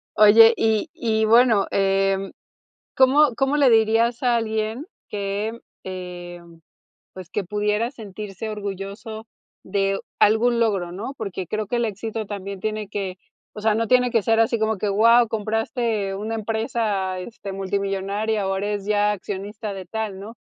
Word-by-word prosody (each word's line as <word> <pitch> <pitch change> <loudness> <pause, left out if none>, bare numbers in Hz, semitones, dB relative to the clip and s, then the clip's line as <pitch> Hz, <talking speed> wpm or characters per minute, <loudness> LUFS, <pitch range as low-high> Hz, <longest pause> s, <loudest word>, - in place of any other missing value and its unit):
Oye, 225 +2 +8
y 220 +6 +1
y 220 -8 0
bueno, 225 -2 +5
em, 195 0 +1 0.6
¿cómo 265 +1 +5
cómo 270 +2 +1
le 275 -3 +5
dirías 225 +2 +3
a 240 -1 +3
alguien 220 +4 -2 0.2
que, 205 +3 -3 0.2
em, 175 -2 -8 0.5
pues, 185 -2 -10
que 205 -1 -2
pudiera 210 +4 0
sentirse 210 -3 -7
orgulloso 205 +2 -6 0.4
de 195 0 0 0.2
algún 235 +3 +4
logro, 195 -6 0
no? 215 +9 -5
Porque 190 -4 -4
creo 215 +3 -3
que 240 - -2
el 235 - +1
éxito 220 +1 -4
también 200 -1 -6
tiene 215 -1 -3
que 195 -2 -4 0.4
o 210 - -8
sea, 215 -1 +3
no 225 0 -1
tiene 250 -1 +4
que 230 -3 +2
ser 225 +2 +2
así 225 0 +2
como 220 0 0
que, 205 +2 -1
wao, 230 +3 +5
compraste 225 -1 -1
una 215 +3 -4
empresa, 215 -3 -1
este, 200 0 -7
multimillonaria, 195 +2 -2
o, 195 - 0
eres 205 0 -2
ya 210 0 +2
accionista 205 +2 -5
de 190 -2 -7
tal, 215 -1 -4
¿no? 220 +4 -9
210 Hz, 150 wpm, -23 LUFS, 195-225 Hz, 0.6 s, Oye